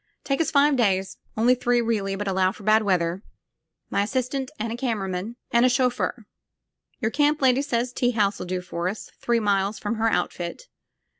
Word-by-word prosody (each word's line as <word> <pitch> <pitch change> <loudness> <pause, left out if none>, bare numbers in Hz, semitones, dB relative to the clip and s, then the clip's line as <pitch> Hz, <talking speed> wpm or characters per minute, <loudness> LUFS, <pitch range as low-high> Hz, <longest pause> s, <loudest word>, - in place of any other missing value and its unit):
"Take 275 +2 0
us 325 - +1
five 285 -1 +4
days. 190 -4 +1 0.2
Only 235 +3 +5
three 245 -1 +1
really, 215 -4 0
but 205 +1 -4
allow 190 -1 +2
for 205 - -13
bad 215 +2 +4
weather. 180 -3 0 0.7
My - - +2
assistant 260 +4 -2
and 225 +1 -3
a - - -3
camera 230 -6 -2
man. 190 +5 -4 0.2
And 235 0 +4
a 255 - +5
chauffeur. 245 -2 0 0.8
Your 220 -1 0
camp 295 +2 +2
lady 260 0 +4
says 245 -3 -1
tea 245 -1 +1
house 210 -4 +1
'U - - -4
do 180 0 -2
for 175 -1 -3
us, 210 - -7
three 235 -1 +1
miles 200 -1 +1
from 210 +2 -3
her 225 +1 +2
outfit. 175 - -2
225 Hz, 195 wpm, -24 LUFS, 195-250 Hz, 0.8 s, Only